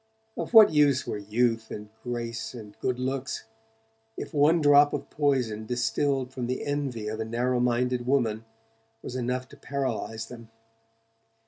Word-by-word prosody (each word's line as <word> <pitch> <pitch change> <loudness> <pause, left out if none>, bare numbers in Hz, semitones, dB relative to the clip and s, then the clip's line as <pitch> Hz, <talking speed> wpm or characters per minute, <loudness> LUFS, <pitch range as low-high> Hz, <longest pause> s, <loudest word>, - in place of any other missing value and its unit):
Of - - -4
what 215 -6 +9
use 145 -3 +4
were 105 - -3
youth 115 +2 0
and 105 0 -7
grace 120 -1 -4
and 105 -3 -10
good 125 -1 -1
looks, 130 +1 -3 0.7
if - - -6
one 150 +3 +4
drop 145 -1 +6
of - - -4
poison 125 -8 0
distilled 130 +2 0
from 125 -2 -3
the 125 - -3
envy 140 -7 -2
of 110 +1 -4
a - - 0
narrow 120 +3 0
minded 125 0 0
woman 115 -5 +1 0.6
was 125 - -6
enough 125 0 -2
to - - -14
paralyze 120 -5 -3
them? 115 -1 -11
125 Hz, 150 wpm, -27 LUFS, 115-140 Hz, 0.7 s, what